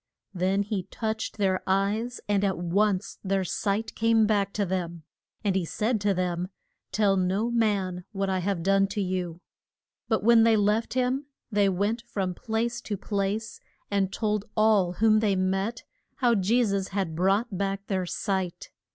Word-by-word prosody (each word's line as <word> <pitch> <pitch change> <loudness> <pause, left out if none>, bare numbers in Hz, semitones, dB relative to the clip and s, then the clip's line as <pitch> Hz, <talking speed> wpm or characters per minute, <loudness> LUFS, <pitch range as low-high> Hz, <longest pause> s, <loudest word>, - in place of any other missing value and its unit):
Then 190 +2 +1
he 200 -3 -3
touched 220 -1 -3
their 190 -2 +1
eyes, 205 +6 0
and 205 -1 +2
at 195 -2 +1
once 195 +3 0
their 195 -1 +1
sight 205 +4 -1
came 225 0 +3
back 200 -2 +1
to 205 - 0
them. 175 -3 -3 0.4
And 200 -3 +1
he 190 - +1
said 215 +6 -1
to 200 -1 +2
them, 180 -1 -1 0.4
Tell 200 0 +3
no 195 +5 0
man 195 -6 0
what 195 -2 -1
I 190 -1 0
have 185 -2 -1
done 195 +1 +3
to 205 +2 -4
you. 180 -3 -2 0.7
But 220 -3 +1
when 230 +1 +6
they 225 -1 +5
left 210 +4 +1
him 260 +3 0 0.2
they 205 -1 +3
went 205 +5 0
from 195 -6 -3
place 230 +4 -2
to 205 -4 -4
place 205 +2 -2 0.3
and 195 -1 +1
told 210 -1 -1
all 210 -5 +4
whom 215 +2 +4
they 210 -3 +2
met 190 +5 -1 0.3
how 245 -2 +3
Je 225 +4 +3
sus 195 -2 -1
had 190 -5 -2
brought 195 +5 +1
back 195 +1 -2
their 185 -3 -1
sight. 190 -1 -3
200 Hz, 170 wpm, -27 LUFS, 190-220 Hz, 0.7 s, when